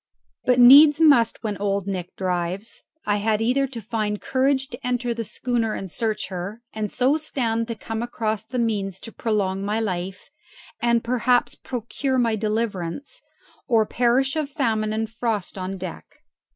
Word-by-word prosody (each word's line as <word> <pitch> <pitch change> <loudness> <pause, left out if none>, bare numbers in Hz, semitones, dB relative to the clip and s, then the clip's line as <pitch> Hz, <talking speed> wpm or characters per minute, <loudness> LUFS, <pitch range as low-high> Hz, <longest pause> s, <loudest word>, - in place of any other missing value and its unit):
But 250 0 +3
needs 285 +5 +9
must 275 -10 +4
when 210 -3 -2
Old 200 -1 0
Nick 185 -3 -4
drives; 185 +3 -2 0.2
I 205 0 +2
had 210 +1 +1
either 255 +5 +2
to 250 -3 -7
find 215 -1 -2
courage 270 0 +1
to 240 - -8
enter 245 -1 -1
the 230 0 -4
schooner 230 0 -1
and 190 -3 -6
search 220 +1 -2
her, 195 +5 -6
and 215 -2 -3
so 260 +4 +2
stand 230 -7 -1
to 230 - -4
come 225 +1 -5
across 220 -3 -2
the 250 +3 -6
means 205 -5 -1
to 225 - -9
prolong 200 -5 -1
my 210 +2 0
life, 185 0 -4 0.5
and 235 -1 +2
perhaps 245 0 +2
procure 260 +2 -3
my 230 -3 +2
deliverance, 215 0 -3 0.5
or 225 -3 +4
perish 250 +5 +2
of 305 -3 -1
famine 225 -7 0
and 220 +1 -1
frost 220 -3 -3
on 190 0 -4
deck. 185 -2 -7
225 Hz, 165 wpm, -23 LUFS, 205-245 Hz, 0.5 s, needs